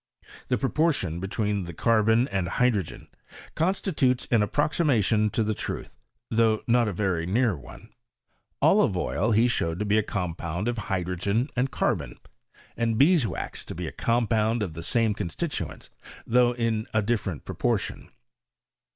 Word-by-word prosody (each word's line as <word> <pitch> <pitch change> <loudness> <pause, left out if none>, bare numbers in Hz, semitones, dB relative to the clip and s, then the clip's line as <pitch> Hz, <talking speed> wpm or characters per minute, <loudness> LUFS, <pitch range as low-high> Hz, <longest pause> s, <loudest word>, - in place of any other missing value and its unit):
The 125 - +1
proportion 135 - 0
between 100 0 -1
the 85 -1 -8
carbon 115 - +3
and 95 -3 -1
hydrogen, 105 -3 0 0.5
constitutes 155 -8 0
an 115 -3 +4
approximation 115 - +2
to 110 - 0
the 110 0 0
truth, - - -5 0.4
tiiough 110 -1 +3
not 120 -1 +3
a - - 0
very 90 -3 -1
near 110 +1 +2
one. 70 -4 -13 0.7
Olive - - +4
oil 75 - 0
he 115 +3 +4
showed 85 -8 -1
to 105 - -2
be 105 +1 +3
a - - +3
compound 90 -1 -3
of 120 -2 -1
hydrogen 95 - -1
and 130 +2 +1
carbon, 80 - -1 0.6
and 115 -1 0
bees' 145 -1 +4
wax 90 - -5
to - - -7
be - - -4
a - - -4
compound 115 -1 +1
of 90 -6 -4
the 85 - -7
same 110 +5 +1
constituents, 145 - -4 0.3
though 125 +1 +3
in 115 -2 -1
a 110 - +3
different 100 -8 -2
proportion. - - -2
110 Hz, 150 wpm, -26 LUFS, 95-120 Hz, 0.7 s, an